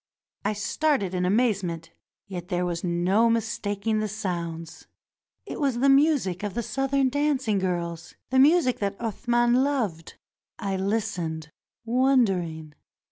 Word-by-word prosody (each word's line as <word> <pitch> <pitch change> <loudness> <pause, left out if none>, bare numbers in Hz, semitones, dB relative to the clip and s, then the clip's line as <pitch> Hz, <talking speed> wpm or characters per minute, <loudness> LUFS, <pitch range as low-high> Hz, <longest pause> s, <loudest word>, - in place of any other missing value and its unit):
I 205 +2 0
started 210 - 0
in 180 0 0
amazement; 185 -6 0 0.3
yet 180 -3 -7
there 180 -1 -1
was 170 -1 -3
no 185 +6 +2
mistaking 220 -2 -1
the 215 - -1
sounds. 170 -6 -5 0.6
It - - -6
was 275 -5 +1
the 275 +3 +3
music 275 - +3
of 205 -1 -4
the 235 - -1
Southern 270 +2 +1
dancing 270 -7 +1
girls 175 -2 -3
— - - -57
the 260 - +4
music 285 -3 +4
that 200 -1 -2
Athman 240 +3 +1
loved. 220 - -2 0.4
I 195 -1 -2
Hstened, 190 -6 -2 0.4
wondering. 195 - +1
205 Hz, 135 wpm, -26 LUFS, 180-250 Hz, 0.6 s, the